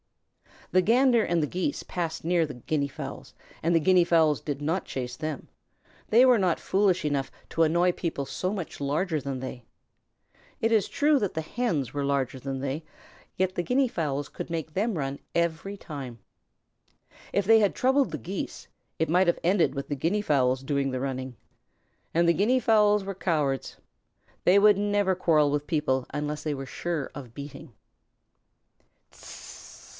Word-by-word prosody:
The 185 - +4
Gander 235 +3 +4
and 170 -4 +1
the - - 0
Geese 185 - -2
passed 170 -3 -4
near 170 0 +2
the 145 -3 -8
Guinea 140 +4 -1
fowls 140 - -8 0.3
and 170 +1 +2
the - - +5
Guinea 180 +2 +4
fowls 160 -4 +3
did 145 -1 -4
not 165 +6 -1
chase 125 -2 -5
them. 155 -3 -5 0.6
They 240 +4 +6
were 250 -3 +5
not 180 -3 +1
foolish 190 -3 +2
enough 140 -3 -1 0.2
to 165 - +2
annoy 170 +3 +3
people 165 -5 -3
so 185 +7 -3
much 185 -6 -6
larger 155 +4 0
than 135 -1 -4
they. 125 -2 -7 1.0
It 225 - +2
is 220 -3 +3
true 295 -1 +2
that 205 -5 -1
the 160 - -2
Hens 160 - -2
were 145 -1 -1
larger 135 -2 -1
than 135 0 -4
they, 140 +4 -3 0.5
yet 185 0 0
the 175 - -1
Guinea 255 +5 +2
fowls 145 - -2
could - - -7
make 160 -2 -4
them 205 +1 0
run 135 -1 -3 0.2
every 170 +4 -1
time. 135 -9 -8 1.1
If 200 - +1
they 225 +2 +6
had 205 -3 +2
troubled 265 - +2
the 155 - -3
Geese, 180 - -6 0.3
it 160 - 0
might 180 +3 +3
have 170 - +2
ended 170 -6 +2
with 140 - -4
the 145 - -1
Guinea 170 +9 0
fowls 130 -7 +1
doing 140 0 0
the 130 -1 -3
running. 130 -1 -4 0.8
And 170 +1 +3
the - - +5
Guinea 235 +8 +2
fowls 210 -3 +4
were 195 0 -4
cowards. 150 -8 -1 0.7
They 185 +3 +6
would 205 0 +6
never 205 -1 +1
quarrel 155 -5 +3
with 145 0 -2
people 150 -6 0
unless 150 +1 -3
they 155 - -1
were 135 -1 -5
sure 160 +1 -4
of 125 -5 -10
beating. 145 -1 -9
165 Hz, 170 wpm, -27 LUFS, 140-195 Hz, 1.1 s, They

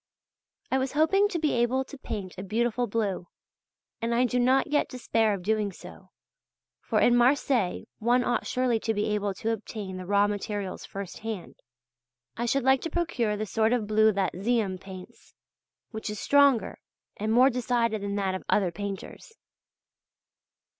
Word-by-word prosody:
I 265 - +3
was 260 0 -2
hoping 320 +7 +4
to 375 - -3
be 310 -2 0
able 245 +2 +1
to 275 - -11
paint 200 -8 -6
a 185 - -6
beautiful 235 +4 0
blue, 200 -5 -2 0.7
and 230 +1 0
I 250 +2 +3
do 250 0 0
not 255 +2 +3
yet 295 0 0
despair 225 -4 +1
of 185 - -8
doing 210 0 0
so; - - -13 0.7
for - - 0
in 240 - +5
Marseilles 245 -5 +2
one 245 +3 +3
ought 245 - -1
surely 250 -3 +1
to 225 0 -1
be 205 - 0
able 205 -2 -1
to 225 +4 -2
obtain 210 -3 -5
the 185 -1 -7
raw 200 +1 +4
materials 205 -2 -4
first 195 -2 -7
hand. 220 -4 -6 0.8
I 235 +1 -2
should 275 +2 +1
like 265 0 +4
to 330 - -3
procure 275 -11 -1
the 215 - -2
sort 220 +3 +1
of 240 -4 0
blue 215 +1 +4
that 195 -1 0
Ziem 210 -4 0
paints, 190 -1 -12 0.6
which 220 -1 -5
is 210 -1 -5
stronger 280 -4 +3 0.4
and 215 +1 -2
more 255 +4 +6
decided 235 -3 0
than 200 0 -3
that 195 -2 0
of 185 - -4
other 190 -4 +2
painters. 200 - -7
225 Hz, 170 wpm, -27 LUFS, 200-250 Hz, 0.8 s, more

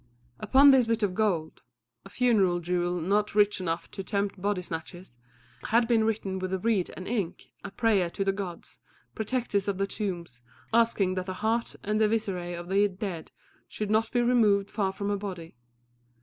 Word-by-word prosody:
Upon 270 +6 +6
this 255 -3 +4
bit 230 -1 0
of 195 -3 +1
gold 180 -7 -1 0.4
a - - -10
funeral 205 -8 +2
jewel 175 +1 -1
not 205 +5 0
rich 205 -2 +3
enough 165 -1 -3
to 195 - -6
tempt 200 -1 -2
body 200 -2 -1
snatchers 170 -2 -8 0.5
had 230 +1 +3
been 225 -2 +3
written 205 -4 -2
with 185 0 -4
a 190 - 0
reed 200 -2 0
and 185 - -7
ink 205 -7 -3
a 200 - -5
prayer 200 -5 +1
to 195 +3 -3
the 195 - +3
gods, 195 -3 -7 0.3
protectors 220 -3 -1
of 200 -2 -1
the 195 - +1
tombs, 175 - -5 0.3
asking 225 -5 +3
that 185 0 -4
the 185 - -4
heart 230 +1 0
and 215 +1 0
the - - +6
visceræ 180 -6 -2
of 175 - -8
the 200 +2 +3
dead 185 -4 -6 0.4
should 210 -1 -4
not 220 +1 +2
be 245 -1 +2
removed 215 -5 +3
far 200 -3 0
from 200 +1 -4
her 205 - 0
body. 180 -6 -7
200 Hz, 185 wpm, -28 LUFS, 180-220 Hz, 0.5 s, Upon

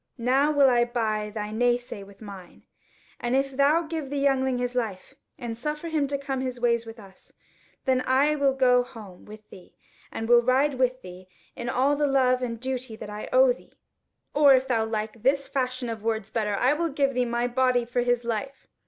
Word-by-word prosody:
Now 265 +5 +2
will 285 -2 +5
I 240 -2 +4
buy 220 -3 -2
thy 210 0 -5
nay 240 +2 +2
say 245 -4 -9
with 200 +1 -17
mine, 195 -4 -11 0.6
and 240 +1 -1
if 270 0 0
thou 290 +5 +3
give 315 -3 -5
the 285 - -3
youngling 265 -2 +1
his 245 0 -2
life, 225 -2 -4 0.2
and 240 -5 -5
suffer 300 +7 -4
him 305 -3 0
to 280 0 -2
come 270 -1 -4
his 255 -2 -4
ways 235 -1 +1
with 225 +1 -10
us, 195 -2 -17 0.5
then 260 -1 +2
will 255 - -4 0.5
I - - -16
go 250 -1 +4
home 215 -7 -11
with 215 0 -13
thee 180 - -15 0.4
and 225 - -4
will 240 0 +6
ride 260 +2 +1
with 255 0 0
thee 180 0 -11 0.3
in 240 0 -5
all 270 +3 +2
the 295 0 +1
love 255 -2 +2
and 230 -2 -3
duty 255 -2 -4
that 210 -1 -9
I 210 +1 -7
owe - - +5
thee; - - -19 0.6
or 285 -2 +6
if 260 +1 0
thou 230 -4 +1
like 220 0 -4
this 275 +3 +1
fashion 255 -2 -2
of 225 -2 -5
words 220 -1 -2
better, 210 -3 -1
I 255 +7 +2
will 335 +2 -1
give 275 -1 0
thee 250 0 +1
my 235 0 -1
body 250 -1 +1
for 245 +1 -1
his 245 0 +1
life. 265 +4 -4
250 Hz, 210 wpm, -26 LUFS, 225-270 Hz, 0.6 s, will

